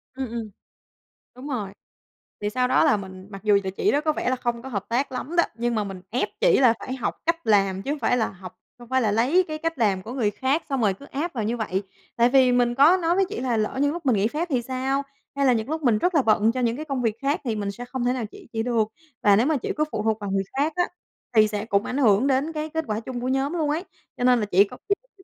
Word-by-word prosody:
Ừm, 265 -1 -3
ừm. 225 -2 -5 0.9
Đúng 260 +3 -8
rồi, 215 -8 -3 0.7
thì 205 - -1
sau 250 +3 +1
đó - - +4
là 215 - +4
mình 190 -1 -9
mặc 195 0 -9
dù 210 -2 +5
là 190 - -2
chị 290 - 0
đó 290 - +2
có 310 0 +1
vẻ - - -1
là 255 - +1
không 240 -1 -3
có 265 - -8
hợp 205 -5 -3
tác 260 +4 0
lắm 295 +6 -5
đó, 345 - +5
nhưng 235 +1 -1
mà 215 - +1
mình 195 -2 -7
ép 245 +3 -1
chỉ - - +5
là 245 -4 +6
phải 260 - -5
học 260 - -2
cách 335 -2 -1
làm 195 -3 +3
chứ 275 - -3
hông 300 - -3
phải 250 - +2
là 220 - +1
học 185 -1 -11 0.2
hông 240 -1 -13
phải 260 0 +2
là 215 -3 +1
lấy 270 - +3
cái 310 -1 -4
cách 330 -1 -3
làm 200 -5 +1
của 230 +6 -8
người 220 -6 0
khác 270 +8 0
xong 270 -3 0
rồi 205 -3 +3
cứ 280 - -13
áp 310 +5 -4
vào 230 -5 -2
như 230 +3 -1
vậy. 205 -3 -2 0.3
Tại 235 +1 +4
vì 260 -1 +5
mình 245 -1 +2
có 300 +8 +6
nói 340 -1 +1
với 390 +1 +3
chỉ 430 - -4
là 245 -3 0
lỡ 215 +4 -1
như 285 0 +3
lúc 340 -1 -6
mình 255 -4 +3
nghỉ 205 +2 +2
phép 315 +8 -2
thì 250 -3 +2
sao, 265 +3 -1 0.3
hay 280 - +1
là 255 - +5
những 225 +3 -2
lúc 315 0 -2
mình 230 -4 +4
rất 355 +8 0
là 300 - +5
bận 220 -2 +3
cho 255 - -4
những 235 -1 +1
cái 310 - -6
công 275 -4 -2
việc 225 -3 0
khác 285 +6 0
thì 230 -5 -1
mình 200 -1 -2
sẽ 245 +4 -8
không 245 0 -3
thể 250 - +2
nào 245 -4 -3
chỉ - - -14
chị 225 0 -1
được. 230 -3 +1 0.4
Và 205 -1 +6
nếu 225 +5 +3
mà 305 0 +2
chị - - -3
cứ 305 - +3
phụ 210 - -2
thuộc 220 -1 +1
vào 205 - -4
người 195 0 +1
khác 300 +3 +1
á 355 - +3 0.5
thì 215 -1 +6
sẽ 210 0 -3
cũng 200 -2 +1
ảnh 260 - -3
hưởng 230 0 +4
đến 275 +4 +1
cái 310 0 -3
kết 320 +1 -2
quả 215 -1 -1
chung 245 +1 -6
của 250 - -2
nhóm 270 +3 0
luôn 315 -4 0
ấy, 320 +5 -1 0.3
cho - - -3
nên 250 -1 +5
là 210 - 0
chỉ 200 0 +5
có 200 - -9
chị 400 - +4
không - - -36
thích 380 - -20
245 Hz, 300 wpm, -24 LUFS, 215-285 Hz, 0.9 s, là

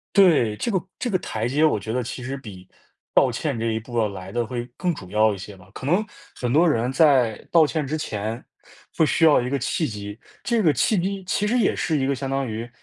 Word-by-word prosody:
对， 155 - +5
这 235 - -2
个 190 - +2 0.2
这 250 - -2
个 200 - +1
台 110 +1 -3
阶 145 +6 +2
我 150 -9 +3
觉 110 +2 -5
得 125 - 0
其 125 +1 -6
实 130 +3 -4
比 100 -9 -11 0.5
道 130 - +5
歉 135 +2 -2
这 115 - -2
一 110 -1 0
步 120 +2 -9
要 110 - +2
来 95 -1 -8
的 120 0 0
会 120 +1 -4
更 180 -1 0
主 95 - -9
要 110 +1 +3
一 100 - -6
些 95 +1 -9
吧， 90 +1 -18
可 130 - -8
能 180 +8 +2 0.3
很 125 -1 -2
多 165 +5 +5
人 125 -2 +1
在 135 -8 +4
道 165 -2 +7
歉 155 -1 -1
之 150 +3 -2
前 110 -5 -4 0.5
会 160 - +4
需 165 - +2
要 155 -5 +6
一 125 - -3
个 140 - 0
契 155 +5 -1
机， 105 -2 -7 0.2
这 235 -3 +1
个 155 - +5
契 210 +6 +2
机 195 +2 -2
其 200 +3 0
实 235 +4 +1
也 235 - +2
是 160 -1 0
一 135 -2 0
个 140 - +1
相 135 +1 -4
当 135 0 -1
于 115 +1 -5
130 Hz, 270 characters per minute, -23 LUFS, 110-160 Hz, 0.5 s, 道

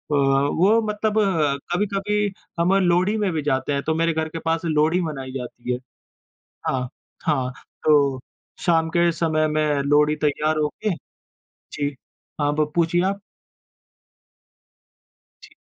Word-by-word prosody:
वो 145 +10 +3
मतलब 215 +1 0
अ, 155 -8 +1 0.2
कभी-कभी 205 +1 0 0.3
हम 180 +3 +3
लोहड़ी 185 +5 +2
में 205 -4 0
भी 155 - -1
जाते 140 0 0
हैं। 140 - -1
तो 160 - 0
मेरे 165 0 +2
घर 160 0 -2
के 165 - -6
पास 165 +1 0
लोहड़ी 160 +3 +2
मनाई 135 -5 -4
जाती 125 -1 -5
है। 125 - -3 0.9
हाँ, 125 -1 -1 0.4
हाँ। 130 -5 0 0.3
तो 140 -3 +4 0.4
शाम 165 -2 +2
के 170 0 +4
समय 155 -1 +1
में 150 -2 +1
लोहड़ी 150 +2 +3
तैयार 155 +1 +1
हो 150 -1 +2 0.2
के 210 - +2 0.8
जी, 145 -1 -2 0.5
हाँ, 145 0 +2
ब 150 -1 0
पूछिए 170 +1 +2
आप? 200 +1 -1 2.2
जी। - - -16
155 Hz, 140 wpm, -23 LUFS, 145-175 Hz, 2.2 s, तो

